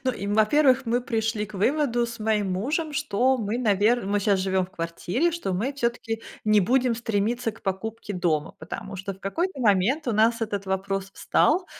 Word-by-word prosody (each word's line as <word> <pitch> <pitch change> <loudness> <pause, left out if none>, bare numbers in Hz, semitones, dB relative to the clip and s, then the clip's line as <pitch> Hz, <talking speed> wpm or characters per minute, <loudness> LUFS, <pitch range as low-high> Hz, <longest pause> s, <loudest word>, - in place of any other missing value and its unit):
ну, 255 - +2
им, 200 -2 -3
во-первых, 260 +4 +4
мы 240 +2 +1
пришли 225 -2 -1
к 215 - -14
выводу 240 +3 +1
с 235 0 -8
моим 215 -3 0
мужем, 295 - -1
что 265 -2 +1
мы, 220 +1 -2
навер 215 0 +2
мы 205 +1 +1
щас 200 -1 +2
живём 190 0 +1
в - - -23
квартире, 175 - -1
что 330 - -3
мы 185 +4 -1
всё-таки 235 -4 -2 0.2
не 215 -1 +5
будем 245 +4 +2
стремиться 225 +1 -1
к - - -17
покупке 210 +3 -4
дома, 165 -4 0
потому 195 +4 -7
что 195 +1 -4
в 190 - -16
какой-то 325 - -2
момент 230 - +2
у - - +1
нас 225 +2 +3
этот 205 -3 -3
вопрос 195 0 -2
встал: 360 +5 +2
220 Hz, 190 wpm, -25 LUFS, 195-245 Hz, 0.2 s, не